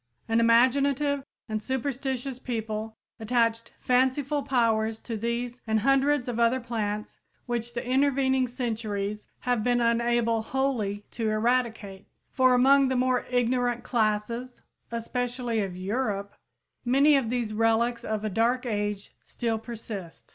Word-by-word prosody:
An 225 0 +2
imaginative 275 +4 +3 0.2
and 215 -1 -2
superstitious 265 0 -3
people 220 -3 -4 0.2
attached 230 0 0
fanciful 260 +3 +1
powers 225 -5 +1
to 230 - -5
these 235 +2 -3
and 220 -1 +2
hundreds 275 +1 +2
of 240 -1 -3
other 235 +2 +3
plants 215 -3 -4 0.3
which 240 -1 -3
the 240 - -3
intervening 265 -1 +2
centuries 215 -4 -3
have 245 -3 0
been 245 +1 +2
unable 235 -1 +2
wholly 220 -5 -1
to 225 -2 -2
eradicate, 220 -3 -1 0.2
for 255 -1 +4
among 270 +2 +5
the 260 - 0
more 255 0 +1
ignorant 245 -1 +1
classes, 235 +1 -1 0.3
especially 245 0 -2
of 190 -3 -3
Europe, 200 0 -2 0.5
many 275 +4 +5
of 265 -5 +1
these 235 -3 -2
relics 225 +2 +1
of 215 -2 -3
a - - +1
dark 240 +5 +1
age 205 -3 -3
still 230 -2 -3
persist. 215 -6 -8
235 Hz, 130 wpm, -27 LUFS, 220-255 Hz, 0.5 s, among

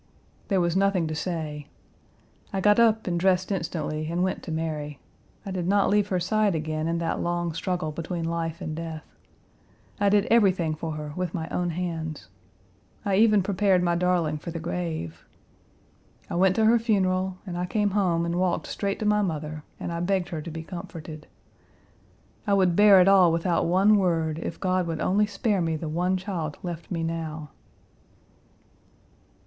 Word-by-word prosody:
There 195 -3 +2
was 170 -1 +1
nothing 195 -3 +2
to 155 - -3
say. 155 -3 -4 0.8
I 195 - -2
got 210 +3 +4
up 225 -1 +4
and 175 -2 -1
dressed 185 +1 +2
instantly 160 -4 -3
and 175 +2 0
went 185 - -1
to 165 - -7
Mary. 155 -2 -3 0.5
I 195 - -5
did 180 -2 -2
not 200 +1 +3
leave 205 -1 +3
her 185 -2 0
side 210 +1 +1
again 155 0 -2
in 170 0 0
that 165 -1 -2
long 175 -1 -1
struggle 180 -2 -2
between 165 +2 -4
life 165 +1 -3
and 155 -3 -4
death. 160 -1 -6 0.9
I 200 0 +3
did 205 0 +3
everything 185 -8 +3
for 160 +1 -4
her 150 -1 -6
with 180 -1 -3
my 160 -2 -3
own 180 -1 -1
hands. 160 - -4 0.8
I 195 -2 +2
even 215 -2 +5
prepared 190 -1 +2
my 175 -1 +2
darling 170 -3 +1
for 160 - -7
the 165 0 -5
grave. 160 - -4 1.1
I - - -2
went 185 +1 +3
to 220 - +3
her 230 +2 +5
funeral, 190 -4 0
and 180 -3 -5
I 180 +1 -2
came 205 +1 0
home 180 -4 +1
and 170 +1 -1
walked 180 -2 0
straight 200 -1 -2
to - - -1
my 210 0 +3
mother 155 -4 -3 0.2
and - - -4
I 170 - -3
begged 180 0 0
her 160 -3 -4
to 165 - -7
be 160 0 -6
comforted; 160 -3 -8 1.2
I 200 - +4
would 185 -3 +3
bear 205 -1 +7
it 180 - +4
all 190 -3 +6
without 170 +1 +1
one 195 +5 +4
word 165 -4 0
if - - -5
God 185 -2 0
would 165 -2 -3
only 205 +5 +2
spare 205 -2 0
me 165 -1 0
the 155 +1 -5
one 180 +4 0
child 175 -5 -4
left 170 -2 -6
me 165 -3 -2
now." 160 -2 -4
175 Hz, 180 wpm, -26 LUFS, 160-190 Hz, 1.2 s, bear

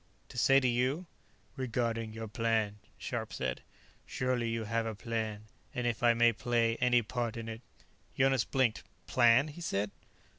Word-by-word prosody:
"To - - -11
say 135 +3 +6
to 130 - +1
you?" 130 +8 +1 0.5
"Regarding 115 -3 -1
your 110 0 -6
plan," 110 -2 0 0.2
Scharpe - - -4
said. 65 -1 -3 0.5
"Surely 125 -2 -1
you 115 0 -2
have 115 +1 -1
a 110 - -4
plan. 110 -1 -3 0.3
And 125 - -1
if 115 -3 -1
I 120 -1 +5
may 120 0 +5
play 115 0 +1
any 125 -1 +3
part 120 +1 -3
in 115 -1 -5
it 115 +1 -6 0.3
" - - -33
Jonas 135 0 +3
blinked. 130 -5 +1 0.2
"Plan?" 125 +4 +4
he 150 +4 -10
said. 100 -10 -1
115 Hz, 170 wpm, -32 LUFS, 110-125 Hz, 0.5 s, say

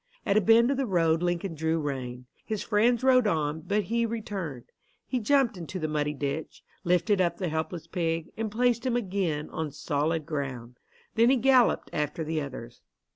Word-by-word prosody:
At 200 - +2
a 215 - +5
bend 230 +5 +5
of 275 - 0
the 270 -2 0
road 165 -4 +2
Lincoln 175 +1 -1
drew 160 +1 0
rein. 130 -4 -4 0.2
His 215 -2 -3
friends 230 +3 +2
rode 255 -3 +5
on, 155 -4 0
but 205 +5 0
he 235 +5 0
returned. 205 - -4 0.4
He 255 - -1
jumped 245 -2 +2
into 175 +2 -6
the 155 -3 -2
muddy 150 -1 -1
ditch, 145 +2 -4 0.2
lifted 185 +3 +2
up 175 -2 +1
the 180 -3 -2
helpless 160 +1 -3
pig, 165 -1 -2
and 220 -1 -2
placed 240 +1 +1
him 255 -2 0
again 185 -9 -1
on 160 -1 -3
solid 150 +2 -1
ground. 130 -6 -5 0.3
Then 230 +1 +4
he 265 - +4
galloped 255 -1 +3
after 150 +2 -2
the 155 0 -2
others. 125 -4 -8
175 Hz, 185 wpm, -28 LUFS, 150-225 Hz, 0.4 s, a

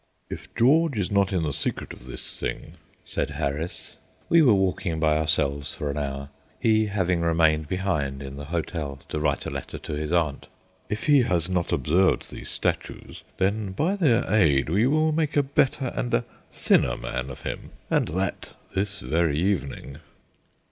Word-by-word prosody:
"If - - -7
George 145 +3 +4
is 100 -2 -1
not 100 -1 +3
in 90 -4 0
the 75 -2 -1
secret - - -2
of - - -13
this 65 - -4
thing," - - -4 0.3
said - - -2
Harris 75 +5 -4 0.3
we 170 - +6
were 135 -6 +6
walking 90 -3 0
by 80 -1 +3
ourselves 70 -2 0
for 75 -1 -2
an 70 - -5
hour, 70 -1 -4 0.3
he 110 -1 +3
having 90 -4 0
remained 80 -2 +3
behind 75 -7 -1
in 70 0 -7
the 70 +1 -7
hotel 80 -3 -3
to 75 - -2
write 75 - 0
a - - -3
letter - - -5
to - - -6
his 75 +1 -3
aunt, 80 -5 0 0.4
"if 105 - -3
he 145 -3 +6
has 90 -6 +1
not 90 -2 0
observed 85 +8 +2
these - - -8
statues, - - -3 0.2
then 100 +1 0
by 165 - +1
their 135 - +3
aid 75 -10 +4
we 105 +9 +3
will 155 +3 +3
make 155 -1 0
a 145 - +5
better 135 -1 +1
and - - -2
a - - 0 0.3
thinner - - +2
man 65 +2 -4
of 65 - -9
him, - - -5 0.2
and - - +2
that 95 +2 -3 0.2
this 100 +2 -1
very 75 +3 +1
evening." 80 -6 -2
85 Hz, 175 wpm, -25 LUFS, 75-105 Hz, 0.4 s, we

